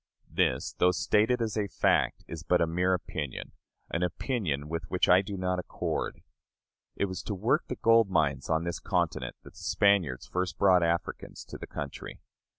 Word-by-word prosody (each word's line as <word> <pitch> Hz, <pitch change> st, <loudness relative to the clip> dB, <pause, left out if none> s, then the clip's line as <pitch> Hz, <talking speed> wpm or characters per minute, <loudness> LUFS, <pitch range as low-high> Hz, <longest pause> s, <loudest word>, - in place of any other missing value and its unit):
This, -, -, +1 dB
though 90 Hz, -, +5 dB
stated 110 Hz, +6 st, +2 dB
as 110 Hz, -2 st, -3 dB
a 105 Hz, -2 st, 0 dB
fact, 95 Hz, -, +1 dB
is 85 Hz, -2 st, -6 dB
but 90 Hz, +3 st, +2 dB
a 85 Hz, -, +3 dB
mere 90 Hz, +3 st, +1 dB
opinion 75 Hz, -6 st, -5 dB, 0.4 s
an 85 Hz, -, -1 dB
opinion 90 Hz, -, -1 dB
with 85 Hz, +1 st, -4 dB
which 90 Hz, -, +2 dB
I 90 Hz, +1 st, +6 dB
do 100 Hz, 0 st, -6 dB
not 90 Hz, 0 st, -1 dB
accord. -, -, -3 dB, 0.7 s
It -, -, +1 dB
was 95 Hz, -1 st, -5 dB
to 105 Hz, -, -4 dB
work 115 Hz, -, +1 dB
the 125 Hz, -, -3 dB
gold 115 Hz, -3 st, +4 dB
mines 75 Hz, -7 st, +1 dB
on 80 Hz, 0 st, +1 dB
this 85 Hz, 0 st, -3 dB
continent -, -, -1 dB
that -, -, -13 dB
the -, -, -15 dB
Spaniards 95 Hz, -11 st, +2 dB
first 90 Hz, +1 st, -2 dB
brought 95 Hz, -3 st, +5 dB
Africans 85 Hz, 0 st, -2 dB
to -, -, -9 dB
the -, -, -7 dB
country. 70 Hz, -1 st, -7 dB
90 Hz, 180 wpm, -29 LUFS, 85-100 Hz, 0.7 s, I